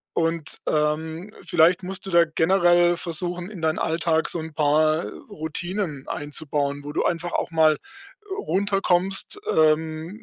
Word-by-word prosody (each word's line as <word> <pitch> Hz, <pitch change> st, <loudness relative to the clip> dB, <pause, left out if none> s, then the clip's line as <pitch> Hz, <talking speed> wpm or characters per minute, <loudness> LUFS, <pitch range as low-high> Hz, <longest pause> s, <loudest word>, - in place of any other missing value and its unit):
Und, 165 Hz, -1 st, 0 dB
ähm, 160 Hz, +5 st, -1 dB
vielleicht 175 Hz, +1 st, +3 dB
musst 190 Hz, +1 st, -4 dB
du -, -, -5 dB
da 170 Hz, 0 st, +6 dB
generell 175 Hz, +1 st, +3 dB
versuchen, 175 Hz, +2 st, -2 dB
in 200 Hz, -6 st, -9 dB
deinen 160 Hz, 0 st, +1 dB
Alltag 160 Hz, 0 st, +1 dB
so 170 Hz, -, -2 dB
'n 160 Hz, 0 st, -7 dB
paar 155 Hz, +2 st, +2 dB, 0.2 s
Routinen 175 Hz, -3 st, -4 dB
einzubauen, 145 Hz, -1 st, -2 dB
wo 145 Hz, -, -6 dB
du -, -, 0 dB
einfach 175 Hz, 0 st, -1 dB
auch -, -, -1 dB
mal 160 Hz, -2 st, +4 dB, 0.6 s
runterkommst, 195 Hz, -, 0 dB
ähm, 155 Hz, +1 st, +2 dB
165 Hz, 135 wpm, -24 LUFS, 155-175 Hz, 0.6 s, da